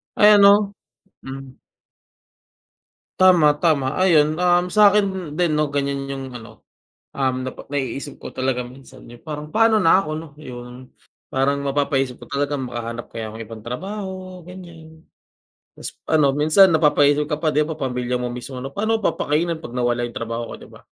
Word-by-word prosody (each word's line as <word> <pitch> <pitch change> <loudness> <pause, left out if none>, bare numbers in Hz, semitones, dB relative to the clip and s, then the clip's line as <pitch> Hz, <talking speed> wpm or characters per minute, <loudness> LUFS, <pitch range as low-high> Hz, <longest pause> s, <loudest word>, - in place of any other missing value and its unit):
Ay, 210 - +6
ano 200 0 +5 0.5
hmm. 135 -1 -9 1.6
Tama, 180 -5 +6
tama. 150 -3 +1
Ayun, 155 -3 +3
um, 180 0 +2
sa'kin 200 -6 +3
din, 175 -2 +1
'no, 150 0 +1
ganyan 140 -1 -2
yung 135 -1 -6
ano, 110 -3 -12 0.5
um, 130 -1 -1
napa 130 - -8
naiisip 135 -1 -4
ko - - -10
talaga 130 -1 -1
minsan, 130 +1 -14
yung 120 - -13
parang, 150 0 -6
pa'no 225 0 +4
na 185 -2 +5
ako, 175 - -4
'no, 160 +1 -7
'yon. 125 -2 -10 0.4
Parang 140 +2 0
mapapaisip 140 -2 -1
ka - - -15
talaga, 145 +1 -1
makahanap 120 -2 -6
kaya 110 -1 -5
ako 110 - -9
ng 115 - -6
ibang 115 0 -10
trabaho, 185 - -6
ganyan. 165 -3 -13 0.7
Tas - - -7 0.2
ano, 150 -3 +3
minsan 155 +6 +5
napapaisip 150 -1 +3
ka 150 - -1
pa, 155 0 -1
'di 150 +1 +1
ba, 160 - -4
pamilya 125 -2 -2
mo 125 0 -3
mismo 125 +2 -8
ano, 135 +2 -6
paano 220 +5 0
mo 215 - -9
papakainin 160 +2 0
'pag 125 -5 -9
nawala 120 -1 0
yung 120 - -15
trabaho 115 0 -4
ko, - - -8
'di - - -14
ba? - - -14
145 Hz, 170 wpm, -21 LUFS, 130-175 Hz, 1.6 s, Ay